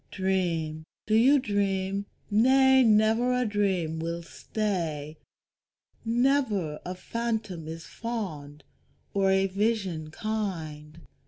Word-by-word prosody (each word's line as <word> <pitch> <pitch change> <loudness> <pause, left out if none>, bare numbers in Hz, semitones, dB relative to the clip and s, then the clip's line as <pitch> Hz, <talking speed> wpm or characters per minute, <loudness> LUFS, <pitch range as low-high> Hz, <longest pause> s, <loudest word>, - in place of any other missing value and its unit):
Dream, 170 -5 -1 0.2
do 215 - -1
you 255 +6 +6
dream? 200 -4 -1 0.2
Nay, 265 +4 +5
never 225 +2 +4
a 250 - +1
dream 190 -7 0
will 170 +1 -3
stay, 165 -7 -3 0.8
Never 230 - +1
a 180 - -5
phantom 215 -6 -3
is 165 +1 -7
fond, 155 -11 -6 0.5
or 195 -1 +2
a 190 0 +3
vision 195 -5 -1
kind. 165 -6 -4
195 Hz, 100 wpm, -27 LUFS, 165-220 Hz, 0.8 s, you